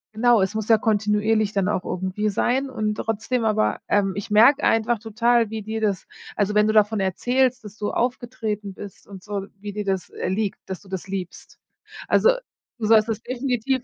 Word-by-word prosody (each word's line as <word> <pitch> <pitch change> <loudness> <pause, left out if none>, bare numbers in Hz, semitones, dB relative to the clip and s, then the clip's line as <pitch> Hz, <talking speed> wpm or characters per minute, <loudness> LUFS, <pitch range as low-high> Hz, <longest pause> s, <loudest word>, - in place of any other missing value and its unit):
Genau, 235 -2 +4
es 190 +3 -1
muss 220 -1 -2
ja 225 - +7
kontinuierlich 215 0 +1
dann 195 -1 +1
auch 185 -3 -1
irgendwie 190 +4 -2
sein 260 +7 0
und 215 -4 -2
trotzdem, 225 +3 -2
aber, 215 0 +1
ähm 195 -2 +2
ich 205 +1 -6
merke 240 +7 +6
einfach 225 +1 +2
total, 230 +1 +1
wie 220 -1 -4
dir 220 +1 -4
das 200 -3 -1 0.3
also 210 0 0
wenn 210 0 +5
du 215 - +1
davon 215 0 +3
erzählst, 245 +6 +1
dass 210 0 -11
du 205 - -2
aufgetreten 225 -5 -3
bist 200 0 -11
und 195 -2 -11
so, 200 -1 -4
wie 205 0 -6
dir 210 0 -4
das, 190 -2 -2
äh, - - -4
liegt, 205 +1 -1
dass 190 - -6
du 195 - -18
das 190 0 -5
liebst. 185 -2 -7 0.5
Also 485 - +5 0.5
du 215 - -1
sollst 220 0 +5
es 220 0 -2
definitiv 255 0 -1
215 Hz, 195 wpm, -23 LUFS, 200-230 Hz, 0.5 s, ja